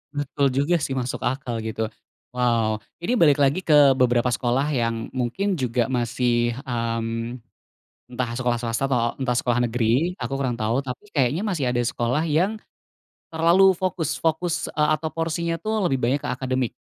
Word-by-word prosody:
Betul 145 0 0
juga 145 +6 +2
sih 135 -2 -2
masuk 125 -1 -3
akal 120 -2 -2
gitu. 110 0 -3 0.4
Wow. 115 -3 +1 0.2
Ini 230 +8 0
balik 145 -3 +5
lagi 140 +6 +2
ke 145 -3 +6
beberapa 125 -1 +3
sekolah 125 +3 0
yang 115 -3 -1
mungkin 135 +11 -1
juga 125 0 0
masih 120 -1 +1
mmm, 115 0 -3 0.7
entah 120 -1 -2
sekolah 120 -2 0
swasta 115 +2 -2
atau 120 -3 0
entah 125 -2 0
sekolah 120 0 +1
negeri, 120 +9 +1
aku 125 +1 -4
kurang 130 -3 -1
tahu. 110 +4 0
Tapi 130 +10 -6
kayaknya 140 +6 +1
masih 165 - -1
ada 120 0 0
sekolah 120 +5 0
yang 180 +8 +1 0.7
terlalu 170 +4 +5
fokus 175 -4 -2
fokus, 170 +1 0
eee, 150 -1 +1
atau 160 +2 -4
porsinya 165 +1 -2
tuh 215 +3 -1
lebih 135 -4 0
banyak 135 +4 +2
ke - - -3
akademik 130 -1 -1
130 Hz, 160 wpm, -23 LUFS, 120-155 Hz, 0.7 s, ke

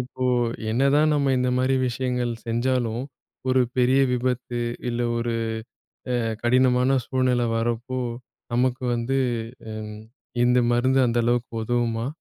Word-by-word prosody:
இப்போ, 130 +1 -5 0.5
என்னதான் 140 +5 +3
நம்ம 140 -2 +2
இந்த 125 0 +1
மாதிரி 130 +1 +2
விஷயங்கள் 125 -1 -1
செஞ்சாலும் 120 0 0 0.5
ஒரு 130 0 +4 0.2
பெரிய 130 +2 +4
விபத்து, 125 -1 -1 0.3
இல்ல 120 0 -2 0.2
ஒரு 115 0 -1 0.8
அ - - +1 0.3
கடினமான 125 +2 +3
சூழ்நிலை 125 -2 +1
வரப்போ, 120 +3 -2 0.5
நமக்கு 125 +1 +1
வந்து 120 +3 0 0.5
அம், 105 -1 -6 0.5
இந்த 125 +1 +4
மருந்து 130 +2 +3
அந்த 120 +1 0
அளவுக்கு 120 0 0
உதவுமா? 120 0 0
125 Hz, 120 wpm, -24 LUFS, 120-130 Hz, 0.8 s, ஒரு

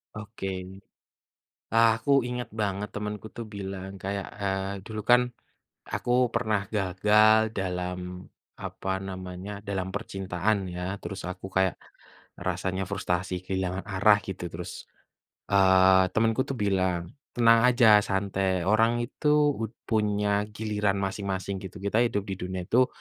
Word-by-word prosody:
Oke, 105 -2 -6 1.3
aku 115 +2 +4 0.2
ingat 125 -1 -4
banget 100 0 -1
temanku 105 0 -4
tuh 120 - -4
bilang 95 -1 -5
kayak, 100 +1 -4
eee, 95 -1 -1
dulu 110 -1 -5
kan, 125 0 +7 0.7
aku - - -3 0.2
pernah 110 -3 +1
gagal 105 +3 +4
dalam, 90 -1 -4 0.3
apa 95 - -4
namanya 95 0 -7 0.2
dalam 95 -2 -2
percintaan 95 0 -1
ya 90 +2 -4
terus 95 -1 -6
aku 90 - -7
kayak 95 -1 +2 0.6
rasanya 95 0 -2
frustrasi 90 -1 -1
kehilangan 95 0 -2
arah 105 +1 +4
gitu 95 -2 -5
terus, 85 +1 -8 0.6
eee, 95 -1 +6
temanku 115 +2 +2
tuh 135 - -3
bilang, 95 -5 0 0.2
"Tenang 115 0 +6
aja 120 -4 +7
santai 95 -2 0
orang 115 +5 +3
itu 125 +5 -4 0.3
ud 110 -1 -3
punya 105 -1 +1
giliran 105 -2 0
masing-masing, 95 0 -3
gitu. 95 +1 -9
Kita 100 +2 +1
hidup 115 -4 +1
di 95 -1 -4
dunia 90 0 -4
itu, 125 +8 +3
100 Hz, 125 wpm, -27 LUFS, 95-110 Hz, 1.3 s, kan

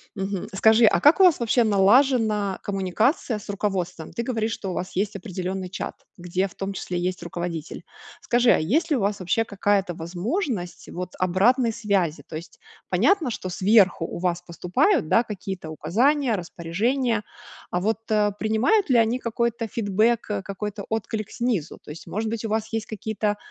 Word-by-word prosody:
Мгм. 195 -1 -3
Скажи, 220 +3 +5
а - - +4
как 295 +6 +5
у - - +7
вас 355 -6 +6
вообще 235 +1 +2
налажена 215 -1 +3
коммуникация 205 - 0
с 210 - -11
руководством? 185 -5 -3
Ты 235 - -2
говоришь, 225 -2 -1
что 195 -4 -4
у - - -4
вас 180 +1 -5
есть 200 +2 -1
определенный 185 -1 -4
чат, 185 - -5 0.2
где 180 +2 -1
в 185 - -17
том 195 0 -4
числе 180 -2 -4
есть 180 +2 -2
руководитель. 170 -2 -5 0.4
Скажи, 240 0 +2
а - - +6
есть 295 - +1
ли 295 - +2
у - - -2
вас 200 +1 0
вообще 185 +5 +1
какая-то 200 -3 0
возможность 180 - -3
вот 180 +1 -5
обратной 225 +7 +3
связи? 200 -8 -1
То - - -8
есть 165 +2 -9 0.3
понятно, 375 -9 +3
что 190 -5 -5
сверху 190 -2 +3
у - - -6
вас 175 -1 -1
поступают, 180 - +1
да, 225 - +4
какие-то 190 -6 -6
указания, 240 - +1
распоряжения, 210 +8 -1 0.5
а 180 - -1
вот, 210 +3 0
а, 210 -1 +3
принимают 220 - +1
ли 250 - +5
они 230 +2 +2
какой-то 235 -1 -1
фидбэк, 210 0 0
какой-то 200 +1 -5
отклик 220 -1 -3
снизу? 225 -10 -2
То - - -12
есть, 155 - -10
может 220 +2 -2
быть, 230 -1 -3
у 225 - -3
вас 220 +1 -2
есть 225 -1 -2
какие-то, 215 -1 -2
205 Hz, 175 wpm, -24 LUFS, 185-230 Hz, 0.5 s, у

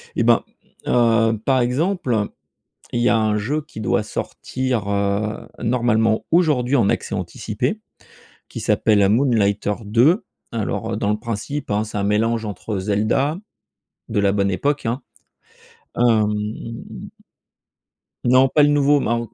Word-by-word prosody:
Et - - +1
ben - - +4 0.4
heu, 115 -2 +3
par 130 -1 +3
exemple, 125 - 0 0.7
il 120 - 0
y 120 - +3
a 120 - +4
un 110 -1 +1
jeu 145 +9 -2
qui 140 -7 -10
doit 110 - +1
sortir 125 -6 -3
heu, 100 +1 -1
normalement 115 -2 +1
aujourd'hui 145 -6 +3
en 100 -5 +3
accès - - -2
anticipé, - - -3 0.7
qui - - -7
s'appelle 105 -3 +3
Moonlighter 105 -4 +2
2. 125 - +3 0.3
Alors 115 -3 -3
dans 100 - 0
le 105 - -1
principe 120 +5 -4
hein, 105 +1 +1
c'est 110 -1 -6
un - - -1
mélange 110 +3 +1
entre 100 0 -4
Zelda 110 - 0 0.7
de - - 0
la 100 -1 +3
bonne 100 -1 +1
époque 140 +6 -1
hein, 120 +5 -1 1.0
hem 115 -3 +3 2.0
Non 130 +2 +5
pas 150 - +3
le 145 - +5
nouveau, 145 0 +3
ma 120 -2 0
115 Hz, 135 wpm, -21 LUFS, 105-130 Hz, 2.0 s, Non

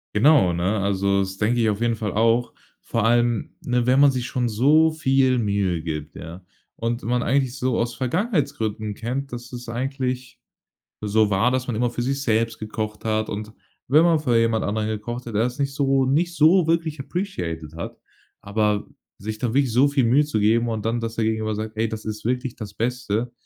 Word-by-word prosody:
Genau, 115 - +5
ne, 90 +5 0
also, 100 0 +1
das 95 0 -2
denke 115 +4 +1
ich 110 - +3
auf 105 +1 -2
jeden 120 -1 +1
Fall 105 -4 -3
auch. 115 +3 +2 0.3
Vor 115 - -2
allem, 120 -1 +2
ne, 125 -1 0
wenn 130 +2 +4
man 140 0 +7
sich 125 -2 -3
schon 125 -1 -1
so 145 +9 +4
viel 135 -4 +2
Mühe 100 -6 0
gibt, 75 -2 -5
ja 85 +3 -9 0.4
und 115 +1 -2
man 125 +2 0
eigentlich 135 -1 0
so 130 -2 0
aus 120 0 -1
Vergangenheitsgründen 125 - -1
kennt, 125 +5 -4
dass 120 0 -7
es 125 -1 -8
eigentlich 125 +1 -3 0.6
so 105 0 +2
war, 105 +5 +2
dass 130 0 -1
man 120 - -2
immer 120 +2 0
für 120 - -3
sich 135 +3 -1
selbst 115 -1 +1
gekocht 110 0 -5
hat. 110 0 0
Und 105 +1 -5 0.3
wenn 150 +5 +5
man 170 -2 +4
für 130 -6 +1
jemand 115 -1 +2
anderen 105 +1 -1
gekocht 115 +3 -4
hat, 115 - -6
er 105 - +3
das 125 +3 -3
nicht 140 -1 -1
so 135 -1 +2
nicht 165 +7 +1
so 170 +3 +5
wirklich 165 -2 0
appreciated 90 - -4
hat, 85 - -6 0.4
aber 105 0 0 0.3
sich 110 +2 -5
da 120 - -1
wirklich 135 -2 +2
so 130 +5 +4
viel 140 -3 +1
Mühe 135 +6 +4
zu 130 -7 -1
geben 115 +3 +2
und 110 -2 -3
dann, 115 +1 0
dass 115 0 -4
der 115 - 0
gegenüber 110 0 -1
sagt: 110 +1 -5
„Ey, 115 +1 +1
das 110 -1 -6
ist 110 0 -6
wirklich 125 +1 -1
das 105 -3 -8
Beste.“ 120 0 -2
115 Hz, 205 wpm, -23 LUFS, 110-130 Hz, 0.6 s, man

